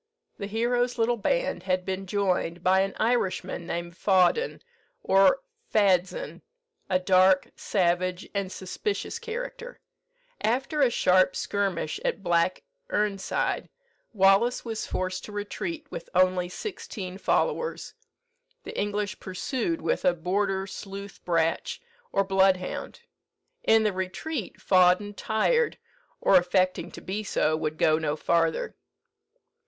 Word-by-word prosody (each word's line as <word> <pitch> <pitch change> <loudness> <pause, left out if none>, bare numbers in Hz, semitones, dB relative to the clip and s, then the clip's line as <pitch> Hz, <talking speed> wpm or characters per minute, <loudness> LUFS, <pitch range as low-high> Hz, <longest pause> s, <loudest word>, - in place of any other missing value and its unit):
The 200 - -4
hero's 245 +3 0
little 235 +1 +2
band - - 0
had 185 0 -1
been 190 0 -3
joined 180 -3 0
by 190 +1 +4
an 195 0 0
Irishman 190 -7 0
named 170 -1 -4
Fawdon, 190 - +2 0.4
or 195 - +4 0.3
Fadzean, 200 - +1 0.5
a 185 - +3
dark, 185 0 +4
savage, 180 -1 0
and 200 -2 -2
suspicious 400 - -4
character. 475 +1 -6 0.6
After 270 +6 0
a 265 - +5
sharp 185 -4 +3
skirmish 195 -6 -1
at 195 - -2
Black 175 0 +1 0.3
Erneside, 205 - -1 0.4
Wallace 200 +5 +3
was 225 -2 -4
forced 185 0 -3
to - - -10
retreat 305 - -4
with - - -7
only 185 -1 +3
sixteen 190 - -6
followers. 475 - 0 0.7
The - - -8
English 205 -1 -2
pursued 260 - -3
with - - 0
a 180 -2 +3
border 190 +3 0
sleuth 200 0 -8
bratch, 170 - 0 0.3
or 195 - +2
bloodhound. 190 - +1 0.6
In 225 - +5
the 210 -2 +1
retreat, 190 - -4
Fawdon, 185 +2 +4
tired, 445 - +1 0.4
or 190 - +5
affecting 180 -1 +1
to - - -10
be 205 +3 -4
so, 155 -5 +1
would 155 0 -3
go 155 0 +3
no 150 -2 -1
farther. 165 +1 0
195 Hz, 120 wpm, -27 LUFS, 185-225 Hz, 0.7 s, a